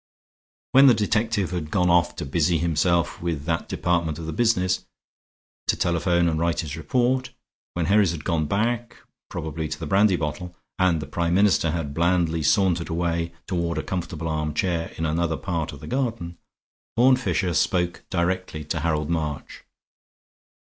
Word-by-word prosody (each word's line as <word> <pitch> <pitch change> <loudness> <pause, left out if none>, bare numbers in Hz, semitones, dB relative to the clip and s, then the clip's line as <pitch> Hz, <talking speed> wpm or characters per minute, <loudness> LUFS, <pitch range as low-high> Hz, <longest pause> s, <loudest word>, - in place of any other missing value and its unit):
When 135 +1 +7
the 125 - +7
detective 105 -2 0
had 85 -4 -3
gone 90 +1 +2
off 85 -1 +3
to - - -5
busy 85 +4 +1
himself 85 +1 +1
with 85 -4 -2
that 80 -1 -2
department 85 -3 0
of 85 - -6
the 80 - -4
business, 95 -5 +1 0.8
to - - +2
telephone 85 0 +1
and 80 -1 0
write 85 0 +1
his 75 -3 -5
report, 125 - 0 0.5
when 85 -2 0
Herries 100 0 +4
had 80 -4 -6
gone 80 -2 0
back, 115 +6 -1 0.3
probably 80 0 -4
to 75 - -5
the 85 - -4
brandy 95 +4 +4
bottle, 85 +3 -4 0.2
and 90 -4 +2
the - - -6
Prime 85 +4 -1
Minister 95 -4 +3
had 80 -3 -3
blandly 85 0 +1
sauntered 90 +1 +2
away 85 0 -1
toward 85 -3 -2
a 80 - -2
comfortable 85 -3 -4
armchair 80 +2 -1
in 80 - -1
another 80 +1 0
part 85 -4 -3
of 70 -2 -11
the - - -8
garden, 115 -10 -3 0.6
Horne 130 +2 +6
Fisher 100 -8 -1
spoke 90 -1 0
directly 90 -3 -1
to 80 - -2
Harold 75 0 -1
March. 75 -3 -4
85 Hz, 160 wpm, -24 LUFS, 80-95 Hz, 0.8 s, When